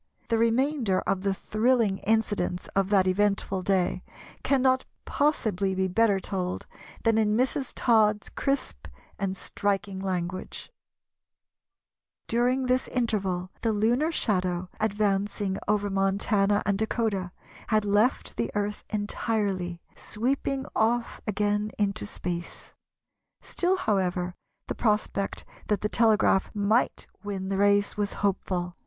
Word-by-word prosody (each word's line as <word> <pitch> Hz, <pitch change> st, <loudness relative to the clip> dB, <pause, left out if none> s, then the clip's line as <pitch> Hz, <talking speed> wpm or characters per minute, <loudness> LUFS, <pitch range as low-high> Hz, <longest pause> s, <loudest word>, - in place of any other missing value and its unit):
The 230 Hz, -1 st, +2 dB
remainder 230 Hz, -3 st, +2 dB
of 190 Hz, -, -1 dB
the 200 Hz, 0 st, +1 dB
thrilling 215 Hz, 0 st, +1 dB
incidents 210 Hz, -4 st, 0 dB
of 195 Hz, 0 st, 0 dB
that 195 Hz, -2 st, +4 dB
eventful 195 Hz, 0 st, +1 dB
day 185 Hz, -1 st, +1 dB, 0.4 s
cannot 260 Hz, -1 st, +3 dB, 0.2 s
possibly 205 Hz, -10 st, +1 dB
be 190 Hz, 0 st, +1 dB
better 200 Hz, +1 st, +3 dB
told 185 Hz, -2 st, -3 dB, 0.4 s
than 225 Hz, -1 st, +3 dB
in 215 Hz, 0 st, +2 dB
Mrs. 260 Hz, +1 st, 0 dB
Todd's 215 Hz, -3 st, +3 dB
crisp 275 Hz, -2 st, -2 dB, 0.3 s
and 195 Hz, -1 st, -2 dB
striking 200 Hz, -1 st, -2 dB
language:— 185 Hz, -, -4 dB, 1.6 s
"During 250 Hz, +3 st, +1 dB
this 255 Hz, +1 st, +1 dB
interval 195 Hz, -7 st, -1 dB
the 225 Hz, -, +1 dB
lunar 235 Hz, +9 st, +2 dB
shadow, 185 Hz, -, 0 dB
advancing 205 Hz, -2 st, 0 dB
over 205 Hz, 0 st, +1 dB
Montana 195 Hz, +1 st, +1 dB
and 200 Hz, 0 st, +1 dB
Dakota, 215 Hz, -5 st, -1 dB, 0.4 s
had 215 Hz, -2 st, +2 dB
left 210 Hz, +5 st, +1 dB
the 120 Hz, 0 st, 0 dB
Earth 205 Hz, 0 st, -2 dB
entirely, 205 Hz, -4 st, -2 dB
sweeping 265 Hz, +4 st, -2 dB
off 235 Hz, +2 st, +1 dB
again 205 Hz, 0 st, 0 dB
into 200 Hz, -, -1 dB
space. 175 Hz, -, -5 dB, 0.7 s
Still, 365 Hz, +2 st, 0 dB
however, 185 Hz, -, 0 dB, 0.3 s
the -, -, -3 dB
prospect 210 Hz, -3 st, -1 dB, 0.2 s
that 210 Hz, -2 st, 0 dB
the 210 Hz, -, 0 dB
telegraph 215 Hz, -4 st, +3 dB
might 210 Hz, +4 st, +1 dB, 0.2 s
win 195 Hz, -2 st, -4 dB
the 195 Hz, -, -1 dB
race 205 Hz, 0 st, +3 dB
was 205 Hz, -1 st, -1 dB
hopeful. 180 Hz, -2 st, -1 dB
205 Hz, 120 wpm, -27 LUFS, 190-225 Hz, 1.6 s, that